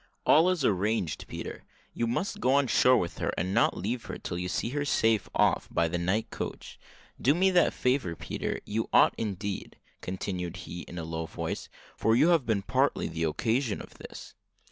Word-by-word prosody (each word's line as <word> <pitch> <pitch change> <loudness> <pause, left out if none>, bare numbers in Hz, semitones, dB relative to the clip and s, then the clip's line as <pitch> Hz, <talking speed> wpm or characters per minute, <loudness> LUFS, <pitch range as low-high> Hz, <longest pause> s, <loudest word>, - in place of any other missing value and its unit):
"All 165 +4 +6
is 175 -7 0
arranged, 95 -6 0
Peter; - - -7 0.3
you 115 - -1
must 190 - -2
go 130 - +2
on 140 0 +4
shore 125 +1 +5
with 85 - -3
her, - - 0
and 90 +2 -1
not - - +3
leave 115 +6 -3
her - - -6
till 85 - -5
you 90 0 -3
see 105 +4 -1
her 145 +3 -1
safe 115 -6 +2
off - - +2
by 85 - +1
the 85 +2 -2
night 95 +6 0
coach. - - -6 0.4
Do 140 +5 +4
me 190 +2 +3
that 180 -1 +4
favour, 125 -9 0
Peter 80 -3 -4
you 110 +2 -2
ought - - +6
indeed," 100 -2 -4 0.2
continued 90 -1 -4
he, 85 - -6
in 90 - -9
a 85 - -3
low 80 0 -4
voice, - - -5 0.3
"for 110 - +2
you 155 +8 +5
have 165 -7 +3
been 105 -4 +1
partly - - +1
the 80 0 -2
occasion 110 - 0
of - - -11
this." - - -10
110 Hz, 195 wpm, -29 LUFS, 90-130 Hz, 0.4 s, All